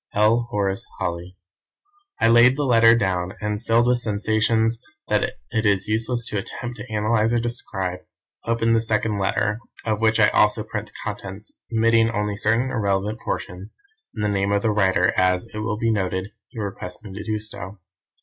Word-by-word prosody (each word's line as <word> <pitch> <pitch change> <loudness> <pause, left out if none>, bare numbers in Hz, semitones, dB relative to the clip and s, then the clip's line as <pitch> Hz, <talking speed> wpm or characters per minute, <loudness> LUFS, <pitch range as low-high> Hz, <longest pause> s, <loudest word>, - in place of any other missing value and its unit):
"L. 110 +3 +3
Horace 100 -1 -1
Holly." 90 +2 -4 0.8
I - - +4
laid 120 +3 +6
the 145 - 0
letter 115 -2 +6
down, 95 -4 -1
and, 105 0 -3
filled 115 0 +3
with 125 0 +2
sensations 110 +1 +1 0.3
that - - +1 0.2
it 110 - 0
is 100 -2 +2
useless 115 +2 0
to 105 - -1
attempt 120 +4 -6
to 120 - -9
analyse 110 +1 +1
or 120 - +3
describe, 95 -6 -3 0.4
opened 115 0 +1
the 115 - +3
second 110 -2 0
envelope, 105 +3 0 0.3
of 110 -1 -1
which 110 0 +3
I 105 -1 +6
also 105 +1 +3
print 105 -1 -5
the - - -21
contents, 105 -1 -7 0.2
omitting 115 0 +3
only 105 -2 -2
certain 115 +5 +1
irrelevant 100 +1 -1
portions, 90 -1 -5 0.4
and 105 - -3
the 105 - +1
name 100 0 0
of 100 0 +1
the 110 - +2
writer 95 -3 +3
as, 90 +2 +2
it 105 - -4
will 105 0 -2
be 115 +1 +1
noted, 95 -1 -2 0.2
he 125 - -16
requests 100 -2 -6
me 100 -3 -9
to 100 - -6
do. 110 -1 -1
105 Hz, 180 wpm, -23 LUFS, 100-115 Hz, 0.8 s, laid